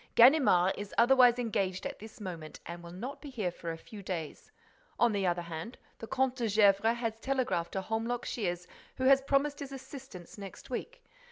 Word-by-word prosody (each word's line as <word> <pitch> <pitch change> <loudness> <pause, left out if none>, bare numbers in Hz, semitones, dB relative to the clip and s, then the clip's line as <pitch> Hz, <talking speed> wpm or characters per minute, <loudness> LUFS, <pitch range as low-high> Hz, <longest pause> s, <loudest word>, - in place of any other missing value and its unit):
Ganimard 235 - +6
is 205 0 -7
otherwise 245 0 +6
engaged 195 -6 -1
at - - -5
this 220 +1 -11
moment 170 -6 -7
and 170 +1 -7
will 170 0 -10
not 235 +10 -6
be 290 - -8
here 215 -9 -2
for 170 -1 -7
a 165 - -6
few 210 +4 -11
days. 175 -5 -6 0.5
On 240 - +5
the 200 -2 0
other 175 0 0
hand, 170 +8 -7 0.2
the 225 - -7
Comte 265 0 0
de 235 -3 0
Gesvres 210 +2 +4
has 225 -2 -3
telegraphed 255 -11 -1
to 190 - -1
Holmlock 225 +4 -2
Shears, 180 -6 -2 0.3
who 260 - -4
has 270 +1 +6
promised 280 +1 +1
his 280 -1 -6
assistance 265 - -10
next 195 +5 -10
week. 470 - -5
225 Hz, 190 wpm, -31 LUFS, 180-260 Hz, 0.5 s, Ganimard